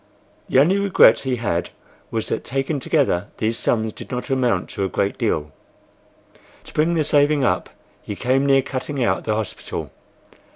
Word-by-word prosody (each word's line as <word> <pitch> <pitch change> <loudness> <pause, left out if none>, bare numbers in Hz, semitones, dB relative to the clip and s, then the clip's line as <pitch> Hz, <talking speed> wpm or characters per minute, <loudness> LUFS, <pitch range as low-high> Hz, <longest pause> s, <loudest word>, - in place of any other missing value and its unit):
The - - +2
only 175 +9 +4
regret 185 - +5
he 130 -2 -1
had 90 -8 -2 0.4
was 110 -1 -2
that - - -2
taken 135 +3 -2
together 125 - +1
these 110 +1 0
sums 110 -2 0
did - - -10
not 125 +2 -4
amount 125 -8 +1
to 100 - -3
a 95 - -1
great 100 +2 -1
deal. 75 -1 -1 1.1
To - - -13
bring 165 +3 +2
the 160 - +2
saving 145 -1 +3
up 120 - 0 0.3
he 105 - -6
came 130 +5 +1
near 135 -1 +4
cutting 135 0 -3
out - - 0
the 110 - 0
hospital. 110 -2 -5
130 Hz, 170 wpm, -21 LUFS, 110-145 Hz, 1.1 s, regret